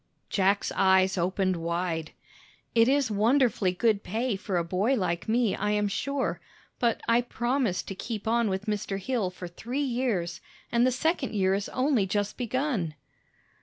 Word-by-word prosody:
Jack's 200 +1 +2
eyes 190 0 +4
opened 185 +1 0
wide. 170 -1 -2 0.6
"It 230 0 +5
is 275 -3 +2
wonderfully 220 -2 +3
good 205 +2 +1
pay 225 +3 -1
for 190 -1 -2
a 170 - +1
boy 190 +10 +1
like 180 -4 -2
me, 230 -2 +2
I 210 - -1
am 210 0 +1
sure. 210 -6 -2 0.4
But 235 -2 +1
I 230 +1 +4
promised 240 -4 -1
to - - -3
keep 210 +2 -5
on 230 -1 +2
with 190 +1 -2
Mr. 210 -2 -2
Hill 230 -3 -1
for 180 0 -8
three 235 +10 -5
years, 235 -10 -1 0.3
and 240 +1 +4
the - - +3
second 275 -1 -1
year 190 -1 +2
is 200 +1 -2
only 255 -6 +1
just 205 +1 -1
begun." 245 - -1
210 Hz, 165 wpm, -28 LUFS, 185-245 Hz, 0.6 s, It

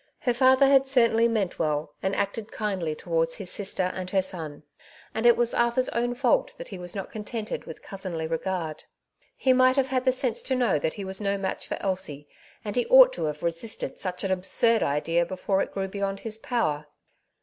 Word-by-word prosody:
Her 245 - +1
father 260 +2 +5
had 270 -1 +4
certainly 235 -3 +4
meant 215 -6 -2
well, 150 -2 -1
and 190 +1 -1
acted 205 +2 -3
kindly 190 -7 -2
towards 165 0 -1
his 190 -3 -3
sister 195 -2 +1
and 185 -1 -5
her 190 0 +2
son; 160 -6 -2 0.5
and 225 +2 +1
it 240 - +6
was 240 -1 +1
Arthur^s 235 +2 +1
own 240 +1 -1
fault 390 - +1
that - - -9
he - - -8
was 175 +1 -5
not 195 - -5
contented 215 +1 -5
with 160 - -10
cousinly 185 -5 -5
regard. 165 -1 -3 0.5
He 260 - +3
might 255 0 +4
have 270 -1 +1
had 255 0 -1
the 260 - +5
sense 255 -2 -1
to 260 - -1
know 240 -11 +2
that 160 - -2
he 200 - -6
was 190 +2 -1
no 200 -1 0
match 190 -1 -4
for - - -3
Elsie, 185 -7 -2 0.4
and 205 - -4
he 245 - 0
ought - - +8
to - - -3
have 150 -1 -4
resisted 170 +6 -3
such 180 -2 -3
an 195 - -1
absurd 220 +5 +3
idea 165 +4 +1
before 190 +2 -1
it - - -3
grew 195 -1 -3
beyond 195 0 -3
his 220 -1 -3
power. 155 - -1
200 Hz, 205 wpm, -26 LUFS, 175-240 Hz, 0.5 s, ought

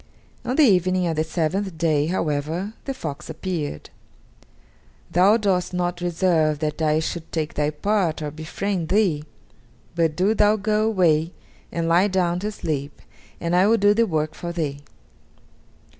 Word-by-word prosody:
On 250 - -2
the 310 - +5
evening 185 -5 +3
of 165 -2 -1
the 155 - +1
seventh 170 +3 -2
day, 155 -2 +1
however, 165 +3 -2
the 270 - -2
fox 155 - -6
appeared. 160 - -4 1.2
"Thou 195 +5 +5
dost 185 -4 0
not 175 0 0
deserve 170 -3 +1
that 150 +1 -3
I 155 0 +2
should 160 +1 -4
take 155 -2 -2
thy 150 0 0
part 175 +2 0
or 150 -1 -4
befriend 160 +3 -3
thee, 180 -7 +2 0.7
but 165 -2 +1
do 190 +5 +2
thou 210 0 +4
go 215 +1 0
away 170 -6 +2 0.4
and 165 -1 -2
lie 175 +4 +4
down 180 -3 0
to 210 +3 -3
sleep, 150 -8 -4 0.4
and 170 +1 -1
I 185 +2 +5
will 225 +1 +4
do 205 0 +4
the 230 +1 +2
work 155 -3 -1
for 170 - -6
thee." 150 -5 -3
175 Hz, 160 wpm, -23 LUFS, 155-195 Hz, 1.2 s, the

